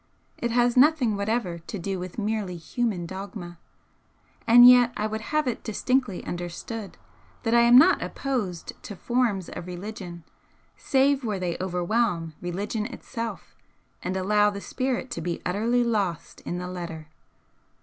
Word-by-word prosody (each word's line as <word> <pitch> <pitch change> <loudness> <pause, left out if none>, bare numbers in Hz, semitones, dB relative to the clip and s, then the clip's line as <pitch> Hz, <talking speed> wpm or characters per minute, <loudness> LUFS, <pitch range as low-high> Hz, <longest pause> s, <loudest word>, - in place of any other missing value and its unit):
It 235 - -1
has 240 0 +2
nothing 260 -5 +4
whatever 200 -4 -1
to 170 +5 -7
do 190 +1 -3
with 180 -1 -7
merely 210 -4 -2
human 195 +1 -2
dogma, 190 -1 -7 0.9
and 240 +1 +9
yet 245 -1 +7
I 210 - -1
would 220 0 -3
have 305 +5 -1
it 245 - -2
distinctly 245 -1 -1
understood 175 +5 -6 0.5
that 225 -1 0
I 235 - +6
am 235 +1 +7
not 340 +8 +6
opposed 215 -11 -3
to 205 - -8
'forms' 230 -4 0
of 175 - -7
religion 180 -2 -7 0.5
save 275 0 +2
where 215 -4 -1
they 180 -2 -2
overwhelm 180 -2 0
religion 205 +5 -3
itself 230 -2 -7 0.5
and 185 +1 -2
allow 210 +2 +3
the 200 -1 -5
Spirit 255 +3 -3
to 165 - -4
be 170 0 -3
utterly 225 +7 +1
lost 205 -8 -2
in 175 - -2
the 180 0 -4
Letter. 170 -3 -6
210 Hz, 150 wpm, -26 LUFS, 180-240 Hz, 0.9 s, and